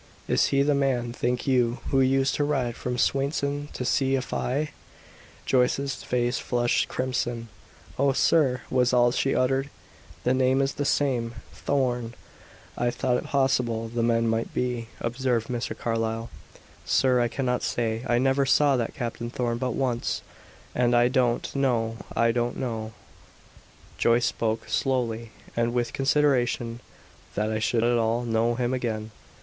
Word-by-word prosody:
"Is - - +3
he 140 0 +2
the 145 +1 +2
man, 130 -4 0
think 125 0 -1
you, 125 -3 +2
who 135 -1 +4
used 135 +1 +2
to 145 - 0
ride 135 -5 0
from 125 -1 -3
Swainson 140 +2 0
to 125 - -4
see 135 +1 +2
Afy?" 135 +3 -2 0.7
Joyce's 135 +2 +1
face 120 0 0
flushed 120 -1 +1
crimson. 120 -2 -2 0.5
"Oh, 140 0 +4
sir!" 135 -2 +3
was 125 -1 +2
all 120 -1 +5
she 135 +2 0
uttered. 135 +2 +1 0.5
"The 125 - +2
name 130 +1 +3
is 135 0 +1
the 145 - -3
same 120 -5 0 0.2
Thorn; 125 -4 -1 0.6
I 120 - 0
thought 125 +1 0
it - - -5
possible 120 -5 +1
the 120 +1 -2
men 115 0 +2
might 115 0 -1
be," 125 -2 -1
observed 120 -1 -1
Mr. 120 -1 -3
Carlyle. 115 0 -2 0.5
"Sir, 130 -2 +3
I 120 - +2
cannot 125 +1 -1
say. 115 -1 -1
I 120 0 +3
never 135 +2 +2
saw 145 0 +4
that 115 -2 -2
Captain 120 0 -4
Thorn 120 -1 -2
but 125 -2 -1
once, 125 -3 -1 0.5
and 120 0 +2
I 120 +1 +5
don't 125 -1 0
know, 115 -5 +1 0.2
I 115 0 +3
don't 120 0 -1
know 115 -4 -4 0.5
" - - -25
Joyce 120 +1 +3
spoke 110 0 -1
slowly 115 -4 -1 0.3
and 120 +1 0
with 120 -1 0
consideration 130 -4 +1 0.6
"that 105 +1 0
I 110 - -1
should 115 +1 +1
at 120 0 +3
all 115 +2 +1
know 115 0 +1
him 125 +1 -1
again. 110 -4 -3
125 Hz, 155 wpm, -26 LUFS, 115-135 Hz, 0.7 s, all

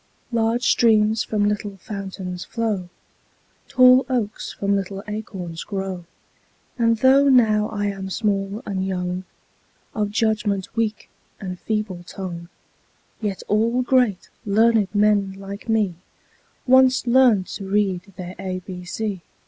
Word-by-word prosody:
Large 230 +1 +1
streams 220 -2 +3
from 205 -1 0
little 205 -1 -3
fountains 190 -3 -6
flow, 215 -6 -2 0.8
Tall 255 +1 +6
oaks 225 -5 -2
from 200 0 0
little 195 0 -3
acorns 190 -6 -6
grow; 190 -3 -5 0.7
And 230 -2 +2
though 270 +4 +5
now 215 -5 +4
I 205 -2 -2
am 195 -1 -3
small 200 +1 -1
and 190 -2 -2
young, 180 -1 -3 0.7
Of 210 -1 -1
judgment 210 -3 -1
weak 220 -2 -1 0.3
and 185 -3 -6
feeble 210 -5 -3
tongue, 175 -2 -7 0.7
Yet 205 -3 -3
all 230 +4 +2
great, 245 -7 +1
learned 220 0 +3
men, 205 -2 +3
like 195 +3 -9
me 215 -5 +2 0.7
Once 260 0 +5
learned 240 -6 +4
to 195 - -6
read 195 -1 0
their 180 0 -6
ABC. 185 +1 -5
205 Hz, 120 wpm, -22 LUFS, 190-225 Hz, 0.8 s, Tall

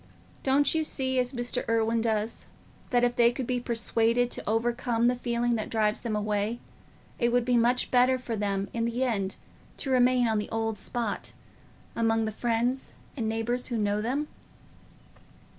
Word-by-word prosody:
Don't 275 +2 +3
you 320 -1 +1
see, 260 -3 0
as 250 0 0
Mr. 245 0 -1
Irwine 230 0 +2
does, 220 0 -1 0.4
that 245 -1 +2
if 245 0 +2
they 235 0 +5
could 255 +1 -4
be 250 +1 -1
persuaded 235 0 +1
to - - -3
overcome 235 +1 +1
the 245 +1 +3
feeling 240 -1 0
that 215 - -4
drives 215 -1 +1
them 225 -3 -3
away, 210 +2 -1 0.6
it 235 -1 +2
would 245 0 +2
be 250 0 +2
much 240 +2 +2
better 255 +1 +4
for 250 -2 -4
them 200 -1 -1
in 230 -1 0
the 235 +2 -1
end 200 -6 -1 0.4
to 270 - -2
remain 250 -1 +4
on 220 -1 +1
the 210 - -4
old 225 -2 -2
spot, 235 -4 -3 0.6
among 225 -1 +2
the 220 - -2
friends 240 +4 -1 0.2
and 225 -5 -2
neighbours 230 +3 -2
who 240 - -2
know 205 -1 0
them?" 270 +7 -1
235 Hz, 175 wpm, -28 LUFS, 225-245 Hz, 0.6 s, they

